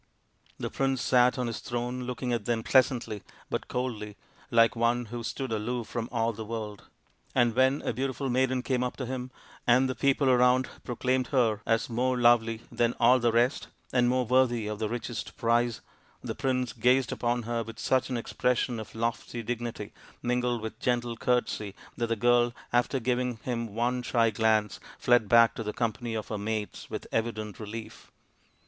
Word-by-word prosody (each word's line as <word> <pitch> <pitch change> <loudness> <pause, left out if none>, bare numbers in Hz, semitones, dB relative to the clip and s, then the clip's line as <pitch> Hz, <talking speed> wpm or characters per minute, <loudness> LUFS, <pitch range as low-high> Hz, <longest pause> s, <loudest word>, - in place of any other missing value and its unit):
The - - -4
prince 135 -1 0
sat 125 0 +4
on 125 - -1
his 115 -2 -3
throne 125 +1 -3
looking 125 0 -3
at 115 -3 -2
them 115 -2 0
pleasantly 120 -5 +2 0.3
but - - -2
coldly, 110 -5 -4 0.3
like 115 0 +4
one 120 +1 +1
who 120 - -3
stood 130 +2 -4
aloof 115 +2 -2
from 115 0 -4
all 115 -1 0
the 110 +1 -6
world; 105 -2 -6 0.5
and 120 -1 +3
when 130 +2 +3
a - - -1
beautiful 135 0 -2
maiden 130 0 +1
came 125 +1 0
up 125 - -3
to 130 - -3
him, 125 0 -4 0.4
and 125 +2 +5
the 130 - -1
people 140 +1 +2
around 125 0 +4 0.2
proclaimed 125 +1 0
her 115 -6 +2
as 115 0 +2
more 125 +2 0
lovely 115 -2 +4
than 120 0 +1
all 125 +2 +6
the 120 -1 +2
rest 120 +4 +1 0.3
and 120 -1 +4
more 125 0 +1
worthy 120 -2 +2
of 105 0 -4
the 110 -1 -1
richest 120 0 -5
prize, 120 -1 +1 0.4
the - - -3
prince 130 -4 -1
gazed 125 +1 +3
upon 120 0 -1
her 115 +1 -2
with 115 0 -8
such 130 +2 +1
an 125 - -1
expression 120 0 0
of 110 0 -9
lofty 115 +1 -3
dignity 120 -2 -4 0.3
mingled 125 -1 0
with 110 0 -6
gentle 120 -1 0
courtesy 110 -3 -1 0.2
that 120 - -1
the 115 - 0
girl, 120 +1 +3 0.2
after 120 +2 +2
giving 125 0 -1
him 115 -2 -2
one 125 +2 0
shy 115 -2 +2
glance, 110 -1 +1 0.2
fled 120 -4 +3
back 115 0 +6
to - - -6
the 105 -1 -3
company 115 0 -2
of 110 - -4
her 105 - -3
mates 105 0 -4
with - - -5
evident 110 -2 -2
relief. 110 +1 -8
120 Hz, 180 wpm, -28 LUFS, 115-125 Hz, 0.5 s, all